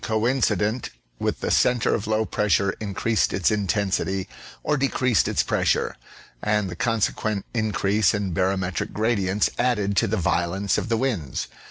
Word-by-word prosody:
coincident 110 -1 0 0.3
with - - -2
the - - -1
centre 120 -2 +3
of 105 - -2
low 110 0 +1
pressure 100 -2 +1
increased 110 +2 0
its 95 0 +2
intensity 95 -2 0 0.4
or 150 - +1
decreased 130 - +2
its - - +1
pressure, - - 0 0.5
and 105 -3 0
the - - -6
consequent 110 -1 -1
increase 105 -3 +2
in 100 -2 -2
baro 95 +3 +1
metric 95 -1 -3
gradients 105 -3 +1
added 105 -5 +1
to 115 - +3
the 110 +2 0
violence 95 +3 0
of - - -5
the 115 - +2
winds. 105 - -2
105 Hz, 150 wpm, -24 LUFS, 95-115 Hz, 0.5 s, centre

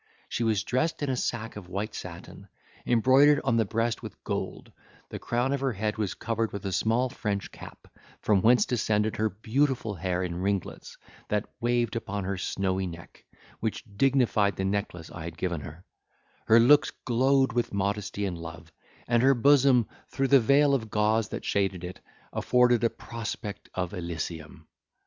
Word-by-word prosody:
She 120 - -2
was 110 -4 +1
dressed 135 +7 -1
in 140 - 0
a - - 0
sack 115 -2 -3
of 95 -4 -9
white 100 +4 -3
satin, - - -9 0.4
embroidered 130 +5 +5
on 120 -4 +2
the 115 - +3
breast 115 +3 -1
with - - -10
gold, - - -4 0.4
the - - -6
crown 125 +3 0
of 140 - -1
her 135 -2 0
head 105 +1 -2
was 105 -4 -1
covered 115 -1 -2
with 100 -1 -6
a 95 - -2
small 115 +7 +1
French 105 -5 -3
cap, - - -12 0.3
from 100 -3 +2
whence 120 +4 +5
descended 110 -3 0
her 110 0 +1
beautiful 115 +2 0
hair 90 0 -2
in 90 0 -4
ringlets 100 -2 -3 0.3
that 105 -1 0
waved 120 0 0
upon 105 -3 -3
her 95 +1 -2
snowy 95 +1 -1
neck, 85 -1 -11 0.4
which 110 -1 -3
dignified 120 -5 +2
the 95 - -2
necklace 95 -4 -3
I 85 -2 -7
had 85 -1 -7
given 85 -4 -2
her; 80 +5 -10 0.6
her 115 +1 +7
looks 145 +6 +6 0.2
glowed 130 +2 +3
with 120 0 0
modesty 100 +1 -2
and 95 -3 -3
love; 85 0 -9 0.4
and 120 -1 +3
her 135 +1 +5
bosom, 135 -2 +5 0.2
through 135 -1 -1
the 140 - +7
veil 140 +4 +4
of 115 -5 -1
gauze 105 0 +1
that - - -6
shaded 95 -3 0
it, 90 +1 -7 0.3
afforded 125 -1 +3
a 115 - +4
prospect 110 -2 -7
of 90 -1 -2
Elysium! 80 -3 -6
110 Hz, 170 wpm, -27 LUFS, 95-120 Hz, 0.6 s, her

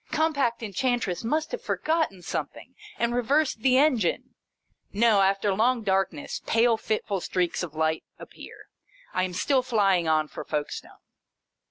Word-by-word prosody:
Com 315 +1 +1
pact 240 -5 0
Enchantress 225 -2 -1
must 305 +7 -1
have - - -4
forgotten 315 - -1
some - - -2
thing, - - -15 0.2
and 235 0 0
reversed 260 +2 +1
the 255 +2 +3
engine. 260 - +1 0.6
No! 215 -1 +4
After 195 +1 +2
long 235 +3 +1
darkness, 195 +9 -1
pale 230 +1 +3
fitful 215 -3 -2
streaks 180 -1 -1
of 165 -4 -6
light 160 0 0
appear. - - -12 0.5
I 185 - +1
am 185 - -6
still 260 +8 +2
flying 195 -8 +2
on 155 -1 +2
for - - -8
Folkestone. 150 -1 -5
220 Hz, 150 wpm, -26 LUFS, 185-255 Hz, 0.6 s, No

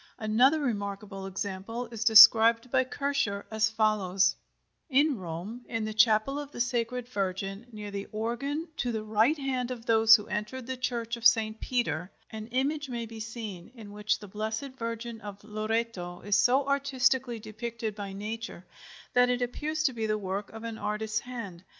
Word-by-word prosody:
Another 245 +8 +3
remarkable 200 -5 -3
example 195 +5 -4
is 225 -1 -3
described 230 +1 +8
by 260 -1 +4
Kircher 265 -7 -1
as 220 0 +2
follows: 210 -4 +2 0.5
In 290 +1 +3
Rome, 185 +8 -6
in 225 -2 -2
the 215 - -4
Chapel 220 +5 +3
of 290 -1 -7
the - - -9
Sacred 245 0 -1
Virgin, 195 0 -3
near 210 -2 -7
the 200 0 -5
organ 275 +9 -3
to 245 - -1
the 220 -2 -3
right 220 +8 +2
hand 260 -3 -2
of 240 -2 -6
those 225 -1 +7
who 210 -2 -2
enter 210 +4 -4
the 260 +1 -5
Church 240 -2 -2
of 230 - +6
St. 220 -2 +2
Peter, 235 -9 -1 0.2
an 220 0 -7
image 275 +4 -1
may 235 -2 -3
be 225 0 -10
seen 220 -4 -7
in 215 -4 -11
which 210 +1 0
the 205 - -11
Blessed 220 +7 -4
Virgin 230 -1 -5
of 200 0 -9
Loreto 215 -4 -3
is 205 0 +1
so 265 +6 +3
artistically 265 -3 +1
depicted 220 +1 -5
by 200 -1 -6
Nature 210 -1 -6 0.5
that 250 0 +5
it 250 0 +1
appears 310 +5 -2
to 270 -5 +2
be 225 -2 -2
the 215 0 +1
work 200 0 -4
of 225 0 -10
an 230 -1 -5
artist's 215 +1 -2
hand. 220 -9 -8
225 Hz, 175 wpm, -29 LUFS, 210-250 Hz, 0.5 s, described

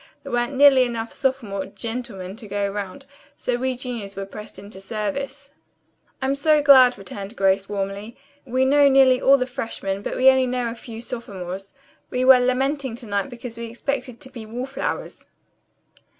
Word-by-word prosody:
There - - -8
weren't 240 +3 0
nearly 275 -1 +7
enough 230 -2 -4
sophomore 230 -8 -2
'gentlemen' 200 -2 -6
to 225 -3 -10
go 205 0 -1
round, 200 +6 -6 0.3
so 250 - -1
we 260 +1 -1
juniors 235 -6 -6
were 195 0 -4
pressed 210 +1 -10
into 200 0 -10
service. 260 +8 -4 0.7
"I'm 265 +1 +1
so 300 +2 +3
glad," 260 -4 +7
returned 195 +2 -8
Grace 195 -1 +2
warmly. 200 +2 -4 0.3
"We 260 0 +1
know 285 +1 +5
nearly 265 -2 +5
all 275 +1 +6
the 255 - -1
freshmen, 225 -6 -4
but - - -4
we - - -2
know 260 -1 +5
only 235 -1 -2
a - - -5
few 230 -1 -9
sophomores. 195 -5 -7 0.3
We 250 0 0
were 260 -1 +8
lamenting 265 +1 0
to 240 0 -10
night 205 +3 -1
because 235 -2 -8
we 235 - -4
expected 250 +1 -4
to 260 - -10
be 235 -4 -8
wall 235 +4 -5
flowers." 270 +1 -5
240 Hz, 175 wpm, -23 LUFS, 200-265 Hz, 0.7 s, were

